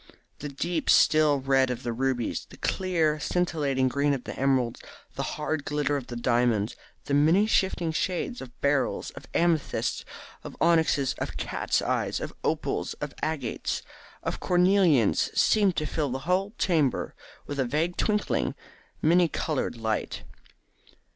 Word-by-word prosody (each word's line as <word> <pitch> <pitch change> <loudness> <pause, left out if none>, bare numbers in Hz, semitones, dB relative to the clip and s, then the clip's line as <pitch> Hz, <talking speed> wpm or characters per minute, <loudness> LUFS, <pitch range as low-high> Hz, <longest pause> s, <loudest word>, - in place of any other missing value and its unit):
The 150 - -5
deep 160 +4 -2
still 150 -3 +5
red 135 -1 +3
of 125 0 -4
the 120 - -2
rubies, 125 -1 -1
the - - -13
clear 165 -5 0
scintillating 150 -7 0
green 140 +2 +1
of 125 - -7
the - - -6
emeralds, 130 -3 +1 0.3
the - - -4 0.2
hard 155 0 -2
glitter 145 0 0
of 135 -3 -4
the 120 - -6
diamonds, 120 -3 +1 0.3
the 140 - -3
many 160 +8 +4
shifting 190 -6 +1
shades 185 +9 -2
of 120 -2 -11
beryls, 140 -1 0
of 140 - -12
amethysts, 165 -3 +1 0.4
of - - -9
onyxes, 160 -5 +3
of - - -4
cats' - - -1
eyes, - - -1
of - - -6
opals, - - -1
of - - -6
agates, 150 -7 -2 0.4
of - - -3
cornelians 180 - +3
seemed 200 -5 +4
to 155 - -1
fill 150 -1 -1
the 130 +3 -5
whole 190 +4 0
chamber 155 -8 +1 0.3
with 145 -1 -5
a 135 - +2
vague 155 +8 -1
twinkling, 210 -1 0 0.5
many 175 +2 +5
coloured 155 -6 -2
light. 110 -1 -2
145 Hz, 145 wpm, -27 LUFS, 130-170 Hz, 0.5 s, still